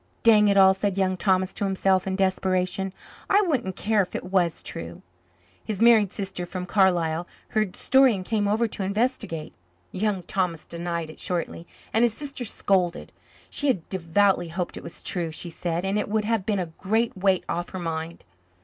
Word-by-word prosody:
"Dang 215 -2 +6
it 200 -1 +3
all," 190 -1 +7
said 195 0 -2
Young 190 -1 +1
Thomas 185 0 +1
to 210 - -4
himself 190 -1 +1
in 190 - -1
desperation. 190 0 0 0.4
"I 405 +1 +5
wouldn't 260 - -1
care 210 +1 +2
if 185 - -4
it - - -3
was 175 -4 +1
true." 85 0 -8 0.6
His 210 -3 -4
married 225 -4 +5
sister 195 -4 -4
from 180 0 -5
Carlisle 175 -3 +2 0.2
heard 215 -4 0
the - - -15
story 265 -3 +4
and 185 -1 -6
came 210 -1 0
over 220 +3 +2
to 210 - -6
investigate. 200 - -2 0.4
Young 200 -2 -1
Thomas 180 -3 -2
denied 170 -1 -4
it - - -14
shortly, 170 -1 -3 0.3
and 225 - +3
his 235 -2 +2
sister 280 -4 -5
scolded. 185 -4 0 0.4
She 290 - +1
had 195 - 0
devoutly 190 0 +2
hoped 175 +2 -4
it - - -7
was - - -10
true, 175 -3 -2
she 170 +2 -5
said, 170 +1 -2
and 195 +2 +1
it 210 - -3
would 215 0 0
have 220 -3 0
been 210 -2 +1
a 185 - -1
great 220 +4 0
weight 190 -1 +2
off 175 +1 -3
her 185 - -6
mind. 165 -1 -4
190 Hz, 190 wpm, -25 LUFS, 175-210 Hz, 0.6 s, all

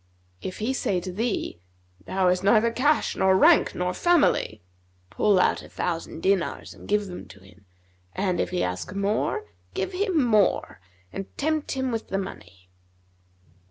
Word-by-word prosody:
'If 185 - -5
he 230 +5 -1
say 195 -8 0
to 185 +1 -6
thee, 205 - -2 0.4
'Thou 190 -1 +1
hast 180 +1 +1
neither 215 +3 +4
cash 290 +6 +1
nor 190 0 +4
rank - - +5
nor 180 0 -1
family'; 295 - +2 0.5
pull 200 - +3
out - - +2
a - - -13
thousand 165 -2 -4
dinars 190 -3 0
and - - -14
give 210 0 +1
them 180 - -8
to 95 +1 -15
him, 95 +1 -20 0.5
and 185 -3 0
if - - 0
he 180 -1 -1
ask 90 - -4
more, 200 +2 0 0.3
give 190 - -2
him 365 -5 +1
more 215 - +2 0.3
and 195 0 -5
tempt 310 +1 -1
him 260 -1 -1
with 225 -1 -4
money.' 95 - -6
195 Hz, 160 wpm, -25 LUFS, 180-230 Hz, 0.5 s, rank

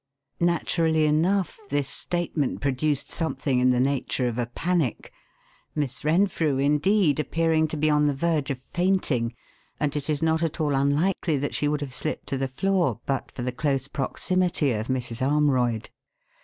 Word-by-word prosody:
Naturally 165 -2 +2
enough, 175 +7 +1
this 145 -1 0
statement 170 -2 -2
produced 140 +1 0
something 150 -5 0
in 125 0 +4
the 125 -1 +3
nature 135 -1 0
of 120 0 -2
a 120 - -1
panic; 165 0 -1 0.6
Miss 135 -4 -2
Renfrew, 160 -3 +2
indeed, 150 +4 +2
appearing 160 0 +1
to 155 - -4
be 155 +1 +1
on 150 -1 +3
the 145 - +2
verge 155 -1 0
of 135 - -1
fainting, 145 -7 0 0.4
and 150 -1 -1
it 145 0 -3
is 150 0 0
not 160 0 +2
at 165 -1 -1
all 150 -2 +1
unlikely 145 +4 +1
that 145 +1 -2
she 145 - +1
would 150 0 0
have 135 -3 -5
slipped 155 - -3
to 135 - -1
the 135 - 0
floor 160 - 0
but 135 -1 -2
for 125 - -6
the 125 - -1
close 135 0 -1
proximity 155 +2 0
of 110 0 -2
Mrs. 125 -2 -2
Armroyd. 130 -5 +1
145 Hz, 170 wpm, -25 LUFS, 135-160 Hz, 0.6 s, in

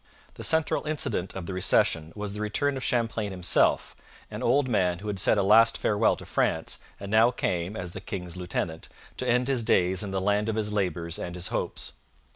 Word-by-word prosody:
The - - -9
central 160 -1 +1
incident 145 - -1
of 95 -3 -5
the 95 - -5
recession 80 -3 +2
was 105 -1 -5
the 105 - -5
return 135 +7 0
of 130 - -5
Champlain 115 -4 0
himself 90 -2 +2 0.4
an - - -6
old 130 +3 +2
man 90 -7 +1
who 105 +4 -9
had 100 -2 -3
said 105 - +3
a 100 - +2
last 115 +3 +5
farewell 105 +1 +2
to - - -11
France - - -1 0.2
and 100 0 -7
now 110 +2 +6
came, 95 -5 -2
as 90 -3 -5
the - - -8
king's 90 -4 -6
lieutenant, 85 -2 -4 0.3
to 125 - -2
end 125 +1 +2
his 135 -3 +2
days 95 -4 +2
in 105 - -4
the 95 0 -1
land 105 +3 +1
of 110 - -1
his 105 -1 -1
labours 90 -3 -2
and 90 -3 -5
his 90 0 -2
hopes. - - -3
105 Hz, 210 wpm, -27 LUFS, 90-115 Hz, 0.4 s, now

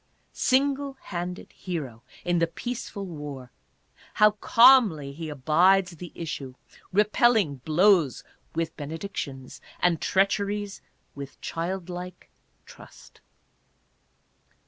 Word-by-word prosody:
Single 275 +1 +1
handed 180 0 -6
hero 145 -11 -6 0.2
in 175 -1 +2
the 170 - +2
peaceful 215 +1 -5
war, 145 -7 -8 0.6
how 210 0 +6
calmly 210 - +5
he 160 +2 -6
abides 175 +7 +3
the 170 0 -10
issue, 140 -6 -6 0.4
repelling 210 - +3
blows 160 - +3 0.3
with 165 0 -2
benedictions 145 -4 -6 0.2
and 175 -3 +2
treacheries 200 +1 0 0.3
with 140 -1 -9
child 175 +2 -4
like 180 0 -8 0.3
trust. - - -16
175 Hz, 95 wpm, -26 LUFS, 150-200 Hz, 0.6 s, how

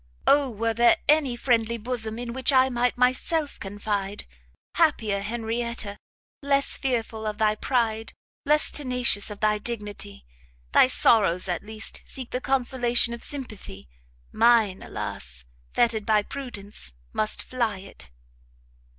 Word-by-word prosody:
Oh 280 -1 +4
were 225 0 -1
there 235 +1 +5
any 290 -5 +4
friendly 235 -2 +1
bosom, 225 -1 -3
in 240 -1 -5
which 260 +2 +3
I 260 -1 +5
might 245 0 0
myself 270 +5 0
confide! 205 0 -3 0.5
happier 230 - +2
Henrietta! 230 0 -3 0.5
less 280 0 +1
fearful 225 -4 -2
of 210 -1 -3
thy 215 -1 +3
pride, 225 -1 -1 0.3
less 300 +1 +2
tenacious 250 -7 +2
of 205 -1 -9
thy 210 0 +2
dignity! 205 - -5 0.5
thy - - +6
sorrows 195 -8 +3
at 175 - -2
least 220 +1 -6
seek 260 -3 -7
the 250 - -2
consolation 245 -3 +2
of 235 - -8
sympathy, 215 - -7 0.4
mine, 225 -4 +3
alas! - - -6 0.3
fettered 225 -3 +2
by 215 -1 +3
prudence, 205 - -6 0.2
must 215 0 +1
fly 235 -5 -1
it!" 190 - -12
230 Hz, 130 wpm, -25 LUFS, 210-250 Hz, 0.5 s, thy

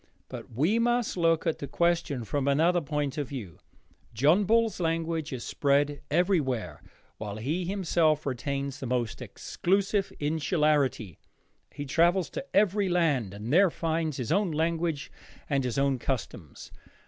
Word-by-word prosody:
But - - -8
we 160 - +1
must 240 0 +1
look 165 -2 +2
at 165 - 0
the 140 - -5
question 170 -5 0
from 140 +5 -2
another 165 +5 +3
point 150 -2 -2
of 145 - -2
view. 105 - -7 0.6
John 155 - +4
Bull's 225 +1 +2
language 165 -2 -1
is 125 -3 -5
spread 145 0 +1
everywhere, 145 - 0 0.4
while 105 -2 -5
he 150 +12 -2
himself 170 -5 +1
retains 140 +1 -3
the 130 - -5
most 120 -3 -2
exclusive 195 +1 -1
insularity. 150 - 0 0.5
He 145 +1 -6
travels 170 +5 +2
to - - -4
every 200 -1 +2
land 150 - +1
and 110 +6 -4
there 190 +2 +6
finds 160 -2 -2
his 125 +2 -3
own 200 +2 +2
language 160 -1 -1 0.4
and 140 -2 0
his 125 -1 -2
own 135 -2 +1
customs. 110 - -5
155 Hz, 145 wpm, -28 LUFS, 135-175 Hz, 0.6 s, there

